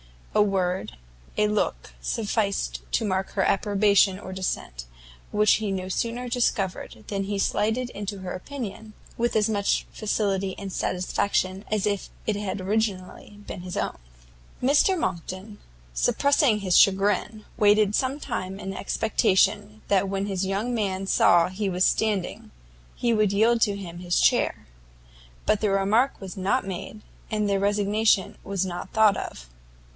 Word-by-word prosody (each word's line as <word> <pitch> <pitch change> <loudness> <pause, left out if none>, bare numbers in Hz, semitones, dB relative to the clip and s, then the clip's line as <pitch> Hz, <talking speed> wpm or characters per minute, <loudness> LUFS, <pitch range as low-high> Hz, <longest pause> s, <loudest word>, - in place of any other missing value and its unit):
A - - +4
word, 190 - 0 0.4
a 210 - +3
look 210 0 -2
sufficed 210 -3 -1
to 225 - +1
mark 190 -1 -1
her 195 - 0
approbation 200 -1 +3
or 190 -1 -8
dissent, 60 - -4 0.4
which 210 0 +4
he 215 -2 -2
no 185 -1 -3
sooner 235 +5 -2
discovered, 195 - -1
than 195 -1 -2
he 200 0 -2
slided 225 +5 0
into 205 0 -5
her 185 -1 -5
opinion, 220 0 -7 0.2
with 235 +1 0
as 215 -1 +3
much 205 -2 +1
facility 195 -3 -1
and 195 -1 -6
satisfaction 185 +1 -1
as 215 -2 0
if 205 -2 -1 0.2
it 215 - 0
had 200 -1 -3
originally 205 0 -2
been 180 - -7
his 180 0 -6
own. - - -2 0.7
Mr 295 +8 +4
Monckton, 185 - -4 0.3
suppressing 250 - +2
his 185 -3 +3
chagrin, 205 +2 +3
waited 210 -1 +4
some 265 +5 0
time 185 -7 -4
in 195 -1 -5
expectation 205 0 +1
that 195 -1 +2
when 195 +1 -2
this 195 -1 -1
young 200 +6 -1
man 195 -4 -1
saw 175 -2 +4
he 195 +2 -2
was 180 0 +2
standing, 210 -5 0 0.5
he 235 -1 +1
would 215 -2 +2
yield 230 +3 +3
to 205 -3 +3
him 175 -4 -8
his 175 -1 0
chair: - - +2 0.8
but 210 - +2
the 215 - +1
remark 205 +7 +2
was 190 -2 -7
not 195 +5 0
made, 195 +3 -6 0.3
and 210 -1 0
the 200 -1 +1
resignation 205 +1 +2
was 195 -1 -1
not 180 0 -6
thought 220 -2 +5
of. - - -7
200 Hz, 150 wpm, -25 LUFS, 190-215 Hz, 0.8 s, thought